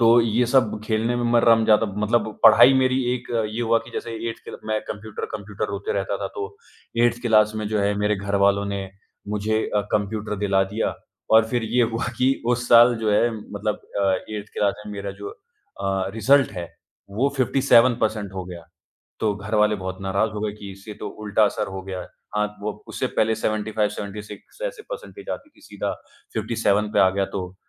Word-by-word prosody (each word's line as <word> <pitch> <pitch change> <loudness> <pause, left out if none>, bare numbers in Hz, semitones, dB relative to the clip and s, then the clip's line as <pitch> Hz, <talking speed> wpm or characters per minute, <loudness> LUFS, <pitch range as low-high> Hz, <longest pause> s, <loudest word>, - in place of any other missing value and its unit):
तो 115 +1 +6
ये 115 +1 +2
सब 120 -4 +2
खेलने 115 +2 0
में 120 - -1
मैं 120 - +5
रम 115 -1 +5
जाता 110 +1 +4 0.2
मतलब 115 +1 +1 0.2
पढ़ाई 120 +4 +8
मेरी 130 0 +2
एक 125 -1 -7
अ, 115 -1 +1
ये 110 +2 -4
हुआ 115 0 +3
कि - - -11
जैसे 115 - -4 0.2
8th - - -11
क्ल - - -8
मैं 110 0 0
कंप्यूटर-कंप्यूटर 105 -1 -5
रोते 100 0 -3
रहता 100 0 -1
था, - - -1
तो 100 0 -7 0.5
8th 120 0 +1
क्लास 110 -3 +4
में 105 -1 -3
जो 105 -1 0
है 100 +1 +1
मेरे 105 0 +1
घर 100 +1 -3
वालों 100 0 +2
ने 95 -1 -4 0.4
मुझे 105 +1 0
अ, 105 - +4
कंप्यूटर 105 0 -1
दिला 95 -1 +3
दिया। 110 - 0 0.4
और 110 0 +7
फिर 120 -1 0
ये 125 - +5
हुआ 115 - -2
कि 130 +1 +4
उस 120 0 0
साल 120 +1 +8
जो 110 -1 +1
है 120 +3 +3
मतलब 105 +1 -4 0.2
अ, 95 -1 +3 0.2
8th 105 -1 -6
क्लास 100 -1 +1
में 105 - -6
मेरा 100 0 -5
जो 100 - -5 0.5
अ, 95 -1 0
रिज़ल्ट 135 +5 +4
है, 90 -3 -5 0.4
वो 120 +8 +1
57 130 -1 +4
परसेंट 105 -3 -1
हो 95 -1 -5
गया। 90 -2 -9 0.6
तो 105 -2 +1
घरवाले 105 +1 +1
बहुत 95 -1 -5
नाराज़ 100 +3 0
हो 105 - -5
गए 105 -1 -2
कि 100 -1 -9
इससे 100 +3 -10
तो - - -4
उल्टा 105 +1 +3
असर 105 +1 -1
हो 95 0 -6
गया 95 -1 -5
है। - - -8 0.3
हाँ, 105 0 +2 0.2
वो 105 - -2 0.2
उससे - - -2
पहले 110 +1 +3
75-76 105 - -3
ऐसे - - -7
परसेंटेज - - -8
आती 295 - -6
थी, 310 - -25
सीधा - - -4 0.4
57 105 -2 +1
पे - - +1
आ 95 - +6
गया, 95 0 0
तो 95 -1 -5
105 Hz, 200 wpm, -23 LUFS, 100-115 Hz, 0.6 s, पढ़ाई